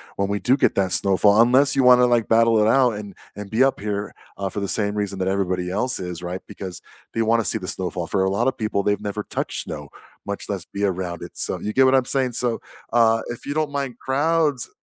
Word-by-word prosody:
when 100 0 -1
we 100 - 0
do 130 +6 +2
get - - +2
that 95 -2 +1
snowfall, 100 +3 +4
unless 130 +4 +4
you 135 - +3
want 125 0 +7
to - - +6
like 120 -2 +2
battle 115 -1 +4
it - - +2
out 125 0 +4
and 105 -3 -8 0.2
and 105 -1 -8
be 115 +4 +3
up 135 - +1
here, 105 0 -4 0.2
uh, 100 -1 -2
for 100 - -5
the 100 - -3
same 105 0 0
reason 100 -2 -3
that 95 0 -2
everybody 90 -2 -1
else 125 +5 0
is, 90 -2 -6
right, 90 +1 -5
because 95 -3 -8 0.3
they 115 - +1
want 115 +1 +2
to - - -6
see 110 - +1
the 90 -3 -7
snowfall. 90 -2 -3
For 95 - 0
a 95 - +1
lot 115 +6 0
of 130 - 0
people, 105 -2 -1
they've 105 0 0
never 105 0 -4
touched - - -4
snow, - - -8 0.3
much 100 0 -5
less 95 -4 -4
be 100 +1 -5
around 90 -3 -2
it, - - -10
so - - -1
you 105 - -4
get 130 0 +5
what 130 +1 +4
I'm 130 -1 +3
saying, 130 -3 0
so, 120 -1 0 0.3
uh, 115 -1 +4
if 120 - -9
you 145 - -3
don't 155 -2 0
mind 135 -4 -4
crowds 145 -1 0
105 Hz, 255 wpm, -22 LUFS, 100-125 Hz, 0.3 s, want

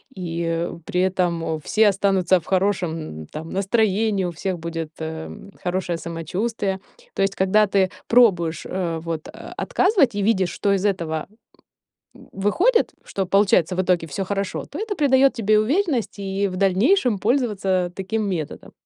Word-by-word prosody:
и 170 -1 -2 0.2
при 180 - 0
этом 175 -4 0
все 215 +7 +3
останутся 190 -2 +2
в 160 - -19
хорошем, 175 - -1
там, 160 +2 -7
настроении, 200 0 +1
у 175 - -2
всех 180 +1 -3
будет, 165 -1 -5
эм, 160 +5 -7
хорошее 180 -1 -1
самочувствие. 190 +5 -3 0.4
То - - +1
есть, 195 0 0
когда 200 +3 +3
ты 190 -1 +2 0.2
пробуешь, 175 -9 +3
а, 170 -3 -2
вот, 160 -1 -5
э, - - -9 0.3
отказывать 370 - +2
и 205 - -1
видишь, 190 -5 +2
что 200 - 0
из 195 +1 0
этого 165 -6 -1 0.9
в 195 - -11
выходит, 460 - +3
что 195 - -2
получается 190 -3 +3
в 185 - +2
итоге 175 -3 +1
всё 190 +7 -3
хорошо, 195 0 -3
то 295 - -8
это 430 -2 -3
придает 270 -2 +4
тебе 215 -2 +3
уверенности 265 - 0
и 195 +1 -1
в 185 - -6
дальнейшем 210 - +3
пользоваться 200 -7 0
таким 210 +2 -2
методом. 165 -6 -5
190 Hz, 155 wpm, -22 LUFS, 170-215 Hz, 0.9 s, придает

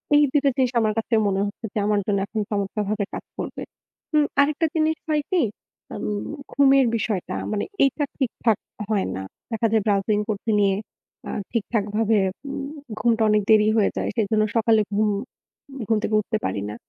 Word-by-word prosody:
এই 295 - +7
২ 290 - +4
টা - - +6
জিনিস 255 -2 +2
আমার 215 -1 +1
কাছে 225 +1 -2
মনে 195 0 +1
হচ্ছে 205 +3 -6
যে - - 0
আমার 210 -1 +2
জন্য 205 -1 +1
এখন 220 - -3
চমৎকারভাবে 205 0 -1
কাজ - - -6
করবে। - - -5 0.5
উ - - +6 0.2
আরেকটা 300 +3 +2
জিনিস 315 0 +2
হয় 300 -1 +2
কী, 365 -2 +3 0.5
আম - - -5 0.5
ঘুমের 275 -1 +5
বিষয়টা 210 -4 -2 0.2
মানে 210 -1 -1 0.2
এইটা 275 +2 +2
ঠিকঠাক 235 -5 +1 0.3
হয় 205 -3 +1
না। 95 - -4 0.3
দেখা 225 0 +1
যায় 220 -1 +3
browsing 205 +1 +2
করতে 215 +1 -3
নিয়ে 200 -1 +3 0.5
আ - - -5 0.2
ঠিকঠাকভাবে 220 -1 +1 0.3
উম 275 0 -4 0.3
ঘুমটা 225 0 +2
অনেক 210 0 +4
দেরি 215 -1 +6
হয়ে 210 - +3
যায়। - - -1
সেজন্য 215 0 +2
সকালে 225 -1 +4
ঘুম, 210 +1 +2 0.8
ঘুম 220 - +3
থেকে 215 - 0
উঠতে 220 +1 -2
পারি 100 - -1
না। 105 - -6
220 Hz, 175 wpm, -23 LUFS, 205-240 Hz, 0.8 s, এই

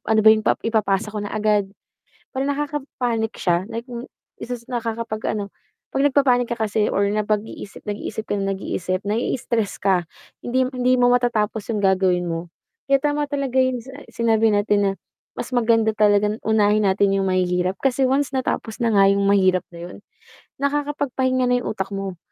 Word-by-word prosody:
ano 220 0 +4
ba 220 - +9
yung 220 - +2 0.2
ipapasa 215 -2 0
ko 210 - -3
na 205 - -4
agad," 210 -2 +1 0.7
Parang 270 +1 -1
nakakapanic 265 -6 -2
siya, 175 -1 +1
like 230 +1 -5
m 245 0 -8 0.3
isa 245 +1 -4
sa 235 - -19 0.2
naka 230 -1 -3
kapag 215 -1 -3
ano 200 -1 -6 0.4
'pag 270 - +1
nagpapanic 265 -4 +3
ka 235 - -2
kasi 215 -1 0
or 200 - +1
na 215 - +1
pag-iisip 210 -1 -4
nag-iisip 210 +1 -4
ka - - -3
ng 195 -1 -1
nag-iisip 185 -1 -3
nai 220 +5 0
stress 230 -5 -2
ka, 190 -2 +2 0.4
hindi 255 +2 +1
hindi 255 0 +2
mo 245 0 +4
matatapos 225 -2 0
yung 225 - 0
gagawin 190 -3 +2
mo, 170 0 -4 0.4
kaya 275 - +6
tama 290 +1 -1
talaga 275 -3 0
yung 255 -1 +1
sina 270 +2 -10
sinabi 225 -1 +2
natin 205 0 +2
na 195 - +2 0.5
mas 245 - -5
maganda 225 -2 +3
talaga 210 -1 +3
unahin 210 -1 +3
natin 195 +1 +2
yung 190 - 0
mahihirap 180 0 0
kasi 270 0 0
once 275 +1 0
natapos 250 -3 -2
na 235 - +2
nga 195 - +6
yung 200 0 +1
mahirap 185 -2 +4
na 170 0 -9
yun, 180 - -10 0.6
nakakapagpahinga 280 -3 0
na 245 0 +2
yung - - -3
utak 195 -1 -4
mo, 195 -2 -5
220 Hz, 180 wpm, -22 LUFS, 200-250 Hz, 0.7 s, ba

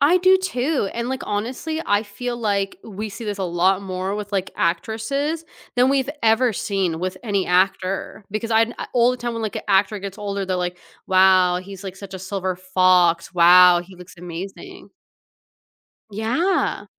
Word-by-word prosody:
I 295 +6 +5
do 370 +1 +5
too, 275 - -1
and, 235 +1 -3
like, 265 +1 -3
honestly, 250 +10 -3
I 205 +1 +2
feel 240 +4 -5
like 200 -4 -1
we 215 0 -6
see 210 +3 -8
this 205 -1 -4
a - - -2
lot 180 +2 +2
more 190 +1 -3
with, 210 -1 -5
like, 195 -2 -2
actresses 225 - -1 0.3
than 250 +1 +4
we've 275 0 +1
ever 225 +1 +3
seen 190 -5 -1
with 185 +1 -3
any 200 -5 -1
actor, 190 +2 0
because 215 +3 -3
I 225 0 +5
kn 235 - -9 0.2
all 245 0 +4
the 250 - -2
time 240 -1 -4
when, 230 -1 -4
like, 215 - -3
an - - -4
actor 200 +1 +2
gets 200 +1 -7
older, 200 -1 -3
they're 185 -1 -1
like, 180 0 -3 0.3
"Wow, 185 -1 +5
he's, 195 +1 -10
like, 190 -1 -7
such 195 -1 -10
a 190 - -5
silver 190 -1 -3
fox 185 -2 +2
wow, 175 +1 +7
he 185 +1 -15
looks 180 0 -13
amazing." 190 - -9 1.2
Yeah. 250 - 0
200 Hz, 180 wpm, -22 LUFS, 185-235 Hz, 1.2 s, wow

